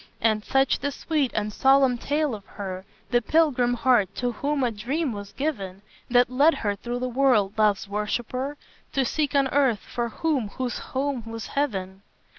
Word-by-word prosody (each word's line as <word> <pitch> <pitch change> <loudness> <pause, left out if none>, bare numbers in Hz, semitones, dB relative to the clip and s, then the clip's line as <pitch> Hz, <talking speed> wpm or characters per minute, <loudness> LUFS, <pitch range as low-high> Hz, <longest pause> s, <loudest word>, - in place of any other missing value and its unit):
And 215 -2 +2
such 270 +2 +2
the 285 - -1
sweet 295 -2 -1
and 210 0 -1
solemn 265 -1 +4
tale 295 0 0
of 205 -2 -7
her 190 -2 -6 0.3
The 240 -1 +3
pilgrim 255 -4 +2
heart, 240 -6 +3
to 245 -1 -1
whom 280 +4 -1
a 245 - +1
dream 255 +7 -2
was 205 -1 -7
given, 200 -10 -4 0.3
That 245 0 +4
led 290 +6 +4
her 205 -2 -1
through 240 +4 -4
the 255 - 0
world, 245 -6 +2
Love's 210 -2 +2
worshipper, 240 +7 -3 0.4
To 270 -1 +2
seek 290 +2 -1
on 275 -1 +4
earth 265 -7 +2
for 240 -1 -3
him 275 -2 -1
whose 255 -2 -2
home 270 -1 -2
was 225 0 -6
heaven! 195 -9 -2
245 Hz, 175 wpm, -25 LUFS, 210-275 Hz, 0.4 s, solemn